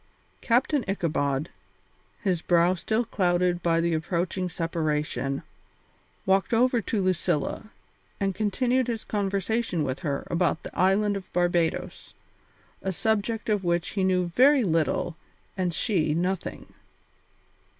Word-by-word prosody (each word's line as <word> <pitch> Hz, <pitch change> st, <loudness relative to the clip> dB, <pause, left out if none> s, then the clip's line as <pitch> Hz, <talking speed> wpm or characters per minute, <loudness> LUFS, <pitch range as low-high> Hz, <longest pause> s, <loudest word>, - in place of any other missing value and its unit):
Captain 255 Hz, +3 st, +2 dB
Ichabod, 155 Hz, -6 st, -1 dB, 0.7 s
his 185 Hz, -5 st, +1 dB
brow 175 Hz, +1 st, +3 dB
still 220 Hz, +6 st, -1 dB
clouded 175 Hz, -4 st, +1 dB
by 165 Hz, -1 st, +2 dB
the 170 Hz, 0 st, +1 dB
approaching 180 Hz, +3 st, -1 dB
separation, 150 Hz, -5 st, -2 dB, 0.8 s
walked 195 Hz, +4 st, +2 dB
over 245 Hz, 0 st, +3 dB
to 205 Hz, 0 st, -1 dB
Lucilla 185 Hz, +2 st, -1 dB, 0.5 s
and 195 Hz, -1 st, 0 dB
continued 245 Hz, +6 st, +1 dB
his 230 Hz, -2 st, -3 dB
conversation 200 Hz, -2 st, -1 dB
with 130 Hz, -2 st, -2 dB
her 140 Hz, -3 st, -3 dB
about 170 Hz, -1 st, +1 dB
the -, -, -9 dB
island 200 Hz, +3 st, +3 dB
of 195 Hz, -2 st, -7 dB
Barbadoes, 175 Hz, -2 st, -1 dB, 0.7 s
a 190 Hz, -, -2 dB
subject 220 Hz, +3 st, -1 dB
of 210 Hz, -3 st, +1 dB
which 170 Hz, 0 st, 0 dB
he 195 Hz, -, -1 dB
knew 185 Hz, -1 st, +2 dB
very 260 Hz, +10 st, +4 dB
little 165 Hz, -1 st, 0 dB, 0.4 s
and 185 Hz, -2 st, 0 dB
she 165 Hz, -5 st, 0 dB
nothing. 180 Hz, +2 st, -3 dB
185 Hz, 120 wpm, -26 LUFS, 170-210 Hz, 0.8 s, very